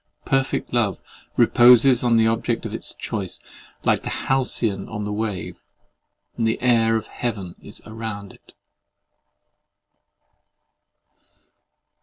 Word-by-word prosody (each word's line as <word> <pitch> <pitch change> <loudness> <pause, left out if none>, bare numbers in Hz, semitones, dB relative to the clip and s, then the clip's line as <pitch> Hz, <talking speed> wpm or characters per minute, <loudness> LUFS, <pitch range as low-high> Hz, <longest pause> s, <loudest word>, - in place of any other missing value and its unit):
Perfect 135 -2 -1
love 115 -5 +1 0.4
reposes 125 +1 +6
on 120 -2 +3
the 110 - +4
object 115 +1 0
of 110 - -5
its 115 - -5
choice, 100 -5 -4 0.4
like - - +2
the - - -5 0.2
halcyon 115 -7 0
on 105 -2 -4
the 105 - -3
wave; 105 -5 -4 0.7
and 115 -2 0
the 110 - 0
air 115 -2 +3
of 110 - -2
heaven 100 -7 -5
is - - -13
around 110 -3 -7
it. - - -21
115 Hz, 115 wpm, -22 LUFS, 105-120 Hz, 0.7 s, reposes